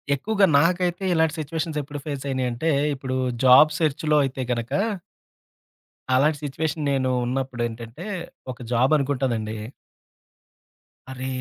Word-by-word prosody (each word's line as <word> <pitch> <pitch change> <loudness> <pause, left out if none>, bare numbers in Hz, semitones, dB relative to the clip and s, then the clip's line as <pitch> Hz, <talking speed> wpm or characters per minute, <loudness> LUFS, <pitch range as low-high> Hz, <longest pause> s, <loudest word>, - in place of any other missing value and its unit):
ఎక్కువగా 200 +7 +2
నాకైతే 175 +2 +1
ఇలాంటి 160 0 +2
సిట్యుయేషన్స్ 155 0 -3
ఎప్పుడు 145 +1 -7
ఫేస్ 140 -3 -4
అయినాయంటే, 130 +3 -1 0.2
ఇప్పుడు 130 -1 -3 0.3
జాబ్ 150 +4 +8
సెర్చ్‌లో 155 -1 +1
అయితే 130 0 -4
గనుక 120 +1 -2 1.4
అలాంటి 145 +4 +3
సిట్యుయేషన్ 150 +2 -2
నేను 130 -1 +1 0.2
ఉన్నప్పుడేంటంటే, 120 - -4 0.5
ఒక 125 - -10
జాబ్ 125 +4 +3
అనుకుంటానండి. 125 -6 -1 1.5
అరే, 130 0 -5
135 Hz, 105 wpm, -24 LUFS, 130-155 Hz, 1.5 s, జాబ్